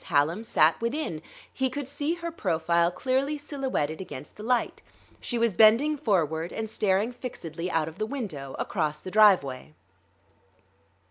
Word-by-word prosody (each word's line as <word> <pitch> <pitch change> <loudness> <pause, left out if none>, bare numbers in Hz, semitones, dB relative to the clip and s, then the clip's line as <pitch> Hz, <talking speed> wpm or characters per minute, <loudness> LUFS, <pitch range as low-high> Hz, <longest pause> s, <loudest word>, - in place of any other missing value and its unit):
Hallam 155 +9 +1
sat 165 -6 +3
within. 235 - -2 0.3
He 265 0 0
could 280 +1 -5
see 290 +4 -1
her 340 -1 -5
profile 170 - +1
clearly 265 +10 -1
silhouetted 265 - -2
against 150 -6 -9
the - - -10
light; 245 +2 0 0.4
she 240 - -3
was 230 -2 +2
bending 230 - +5
forward 170 - 0
and 220 - -4
staring 210 +1 +1
fixedly 175 - -6
out 160 -3 0
of 160 +4 -9
the 215 - -1
window, 180 - -5
across 155 -5 -2
the 185 - -8
driveway. 165 -10 +4
210 Hz, 145 wpm, -27 LUFS, 160-255 Hz, 0.4 s, bending